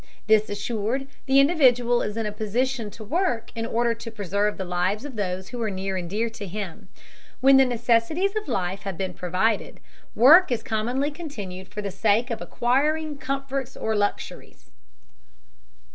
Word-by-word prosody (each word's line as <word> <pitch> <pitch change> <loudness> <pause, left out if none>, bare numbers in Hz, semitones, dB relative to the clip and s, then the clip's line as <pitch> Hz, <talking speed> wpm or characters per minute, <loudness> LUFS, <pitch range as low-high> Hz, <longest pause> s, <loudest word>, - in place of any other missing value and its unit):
This 215 0 +4
assured, 220 +5 -2 0.2
the 270 +1 +5
individual 250 -6 +4
is 210 +1 -3
in 225 - -1
a 210 - -2
position 225 +3 -1
to 215 - -11
work 250 - -1
in 225 0 -3
order 235 0 +1
to 230 0 -8
preserve 205 -1 -1
the 190 - -4
lives 180 +6 -1
of 280 -4 -7
those 190 -2 -3
who 245 -1 -6
are 220 - 0
near 190 0 -3
and 175 -2 -4
dear 220 +5 0
to 225 -3 -7
him. 195 0 -6 0.5
When 270 +1 +6
the 270 - +6
necessities 240 - +1
of 430 -1 -3
life 190 +1 -2
have 195 -4 -5
been 185 0 -3
provided, 185 +5 -1 0.4
work 310 +8 +7
is 230 -2 -1
commonly 245 +6 -1
continued 205 - -7
for 210 +2 -6
the 200 - -3
sake 220 +5 +1
of 230 - -3
acquiring 295 +4 0
comforts 275 -2 -3
or 220 0 -1
luxuries. 205 0 -4
225 Hz, 170 wpm, -25 LUFS, 205-265 Hz, 0.5 s, work